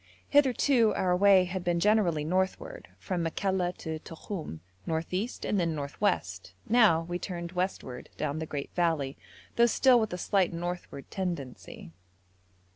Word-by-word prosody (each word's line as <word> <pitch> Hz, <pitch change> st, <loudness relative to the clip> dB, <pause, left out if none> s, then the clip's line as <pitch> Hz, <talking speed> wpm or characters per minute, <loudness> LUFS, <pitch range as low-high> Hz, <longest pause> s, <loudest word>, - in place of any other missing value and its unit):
Hitherto 260 Hz, -4 st, +4 dB
our 180 Hz, -1 st, +2 dB
way 195 Hz, 0 st, +6 dB
had 180 Hz, 0 st, -4 dB
been 175 Hz, -1 st, +1 dB
generally 185 Hz, -6 st, +2 dB
northward, 190 Hz, -, -2 dB
from 185 Hz, -3 st, -3 dB
Makalla 180 Hz, +2 st, 0 dB
to 160 Hz, -1 st, -5 dB
Tokhum, 160 Hz, -, -7 dB, 0.3 s
north 160 Hz, +2 st, -2 dB
east, 205 Hz, +7 st, -3 dB
and 205 Hz, -, +1 dB
then 165 Hz, -2 st, 0 dB
north 140 Hz, +2 st, -6 dB
west; 95 Hz, -, -1 dB
now 215 Hz, -8 st, +5 dB
we 175 Hz, +1 st, -4 dB
turned 170 Hz, -3 st, -5 dB
westward 180 Hz, -9 st, -4 dB
down 145 Hz, +2 st, -2 dB
the 160 Hz, -, -4 dB
great 140 Hz, -2 st, -5 dB
valley, 160 Hz, -6 st, 0 dB, 0.4 s
though 235 Hz, 0 st, +6 dB
still 250 Hz, +1 st, +5 dB
with 220 Hz, -2 st, -1 dB
a 180 Hz, -, -3 dB
slight 190 Hz, 0 st, +1 dB
northward 175 Hz, -4 st, -6 dB
tendency. 145 Hz, -, -5 dB
180 Hz, 150 wpm, -29 LUFS, 160-200 Hz, 0.4 s, way